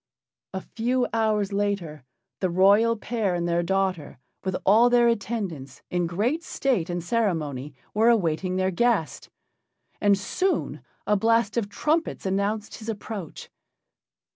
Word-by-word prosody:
A 190 - -2
few 245 +4 -1
hours 215 -3 +1
later 200 -8 -2 0.4
the 185 - 0
royal 200 +6 +4
pair 210 -4 -1
and 175 0 -1
their 170 0 +1
daughter, 185 -5 -1 0.3
with 190 -1 -2
all 225 +5 +6
their 240 -1 +4
attendants, 200 - -3
in 175 -1 0
great 230 - -1
state 245 - -1
and 175 -1 -3
ceremony, 155 - -1 0.2
were 220 +3 +4
awaiting 185 -4 +1
their 185 0 +1
guest. 195 - 0 0.7
And 200 -1 +4
soon 365 - -1 0.2
a 210 - +3
blast 225 +1 +2
of 225 -4 -1
trumpets 310 +8 -1
announced 200 +3 -1
his 225 0 -7
approach. 210 -5 -6
200 Hz, 135 wpm, -25 LUFS, 175-230 Hz, 0.7 s, all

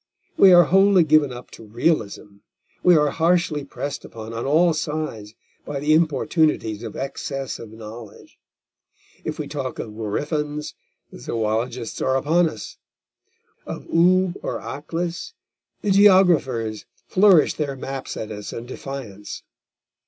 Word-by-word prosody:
We 195 - +7
are 175 -1 +8
wholly 195 +2 +5
given 155 -3 +3
up 125 0 -10
to - - -12
realism, 110 -4 -2 0.4
we 180 -2 +6
are 150 -1 +2
harshly 165 -2 +1
pressed 140 +1 -6
upon 110 0 -9
on 115 +3 -4
all 165 +4 +4
sides 150 -9 -4 0.3
by 145 -1 -5
the 150 +2 +2
importunities 155 - +1
of 115 -3 -7
excess 135 0 -5
of 115 - -9
knowledge. 110 0 -12 0.8
If - - -4
we - - -4
talk - - -5
of 105 - -6
gryphons, 150 +7 -3 0.4
the - - -11
zoologists 115 - -3
are 130 - +1
upon 165 +5 +2
us; 110 -7 -10 0.9
of - - -7
Oolb 180 +2 +3
or - - -3
Aklis, 170 - -5 0.5
the 205 - +1
geographers 175 - +4 0.2
flourish 190 -4 +5
their 145 -3 -3
maps 135 0 -6
at 110 - -5
us 105 -1 -7
in 115 - -7
defiance. 120 -6 -8
145 Hz, 135 wpm, -22 LUFS, 115-165 Hz, 0.9 s, are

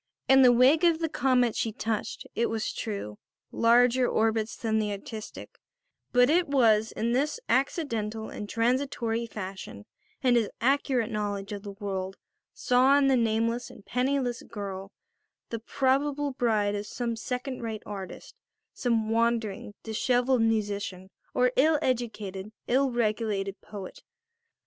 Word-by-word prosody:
In 265 0 +7
the 250 -2 +8
wake 260 +7 +5
of 340 -2 +5
the 325 0 -1
comet 250 -5 +2
she 225 - -1
touched, 220 -1 -3
it 235 - 0
was 225 -1 -2
true, 200 - -5 0.3
larger 245 +2 +4
orbits 220 -1 0
than 220 -1 0
the 210 -1 -1
artistic; 215 +2 -8 0.5
but 245 0 +5
it 340 +5 +3
was 225 -6 +3
in 230 +1 -1
this 285 - 0
accidental 225 -6 -1
and 205 - -7
transitory 235 -1 0
fashion, 190 - -7 0.4
and 250 -2 +4
his 225 -3 +1
accurate 255 -2 +1
knowledge 205 -2 -3
of 205 -1 -5
the 200 -1 -8
world 195 -2 -4 0.3
saw 255 +3 +4
in 275 -1 +4
the 265 - +4
nameless 230 0 0
and 200 - -15
penniless 250 -1 0
girl 195 -2 -7 0.6
the 230 - -3
probable 280 +4 0
bride 220 -5 +1
of 205 0 -4
some 235 0 -3
second 250 +3 -4
rate 225 -2 -5
artist, 195 -2 -8 0.4
some 225 -3 0
wandering, 225 -3 0
dishevelled 245 +3 +1
musician, 205 -4 -1 0.2
or 250 0 +3
ill 310 +4 +4
educated, 215 -5 -3 0.2
ill 270 +2 +3
regulated 215 -4 -1
poet. 200 -3 -9
230 Hz, 140 wpm, -28 LUFS, 210-255 Hz, 0.6 s, the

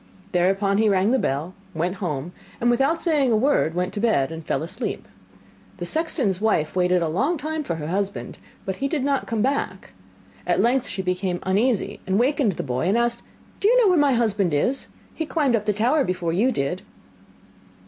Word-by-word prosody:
Thereupon 195 +3 +2
he 220 -1 +4
rang 195 +2 +2
the 265 - +3
bell, 150 - -2 0.2
went 175 +4 -1
home, 165 -3 -3 0.3
and 240 +1 +3
without 275 +7 +2
saying 295 -8 +2
a - - +4
word 215 - +2
went 180 +1 -1
to - - -3
bed, 200 - +2
and 160 0 -7
fell - - -1
asleep. 190 +9 -5 0.7
The - - -4
sexton's 270 - -1
wife 175 -9 +1
waited 180 -1 +2
a - - 0
long 270 - 0
time 310 +1 -3
for 170 - -3
her 155 -2 -5
husband, 195 +4 -3 0.3
but 190 -1 -3
he 275 - -1
did 285 -2 -1
not 280 -1 0
come 225 -2 0
back. 255 -8 -2 0.5
At 175 - +2
length 245 +5 +2
she 190 0 -3
became 180 0 -1
uneasy, 210 +4 0
and 190 +1 +1
wakened 250 -2 +2
the - - -4
boy, 130 +4 -1
and 200 +5 +2
asked: 235 0 0 0.4
'Do 400 - +2
you - - +5
know 445 -5 +5
where 360 -3 +4
my 285 -2 +4
husband 205 -8 +1
is? 250 - 0 0.3
He 320 - -4
climbed 290 -8 +2
up 215 -1 -2
the - - +4
tower 245 +9 +2
before 180 -5 -2
you 225 +9 +2
did. 175 - -2
205 Hz, 200 wpm, -23 LUFS, 180-265 Hz, 0.7 s, you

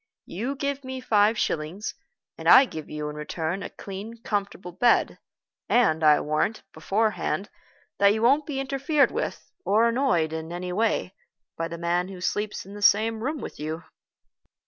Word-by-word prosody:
"You 240 +10 -4
give 280 0 -3
me 260 0 -5
five 220 -3 +3
shillings, 170 +4 -2 0.4
and - - -1
I 275 - +9
give 160 - -8
you 150 0 -4
in 150 - -7
return 160 +4 -3
a - - -5
clean, 205 +4 -8
comfortable 200 -3 -3
bed; 235 +7 +2 0.5
and 160 -10 +3
I 150 -1 +6
warrant, 155 +9 -1
beforehand, 205 +3 -1 0.5
that 200 0 +6
you 220 +2 -1
won't 280 +5 +4
be 280 -3 -3
interfered 275 +2 +1
with, 470 - -4
or 220 +3 +3
annoyed 230 - +1
in 160 +1 -5
anyway, 180 +3 -1 0.4
by 165 - -2
the 170 - -7
man 175 +1 0
who 190 -1 -9
sleeps 210 +3 -2
in 195 - -11
the 205 - -9
same 220 +2 +3
room 295 +1 -2
with - - -8
you." 155 +2 -4
205 Hz, 165 wpm, -26 LUFS, 170-240 Hz, 0.5 s, I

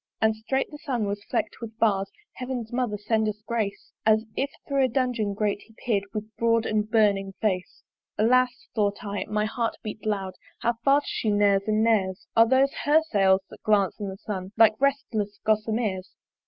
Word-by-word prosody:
And 220 0 +3
strait 265 +7 -2
the 295 - -9
Sun 245 -7 -2
was 205 0 -3
fleck'd - - -2
with 225 -1 -8
bars 195 -4 +2 0.2
(Heaven's 250 -3 -5
mother 240 -4 -1
send 220 +1 0
us 210 0 -5
grace) 220 -4 -3
As 220 0 +3
if 275 - 0 0.2
thro' 275 -2 +2
a - - +2
dungeon 240 -5 -1
grate 205 -1 -1
he 225 - -20
peer'd 205 -4 +1
With 215 +1 -6
broad 230 -1 +2
and 215 0 0
burning 200 -3 +2
face. 185 -4 -2 0.3
Alas! 250 +3 +2
(thought 205 -2 0
I, 200 0 -3
and - - -5
my 210 0 +1
heart 230 +1 -2
beat 215 -1 -6
loud) 195 -3 -1 0.3
How 235 - +2
fast 280 +2 +4
she 220 - -1
neres 205 -1 +3
and 215 +1 +2
neres! 195 -5 +1
Are 225 0 +6
those 265 +3 +3
her 300 +2 +5
Sails 195 -2 +4
that - - -13
glance 205 -2 +2
in 205 -2 -3
the 190 - -7
Sun 195 -1 -6
Like 220 -1 +7
restless 235 -7 0
gossameres? 215 -3 0
215 Hz, 190 wpm, -26 LUFS, 205-235 Hz, 0.3 s, Like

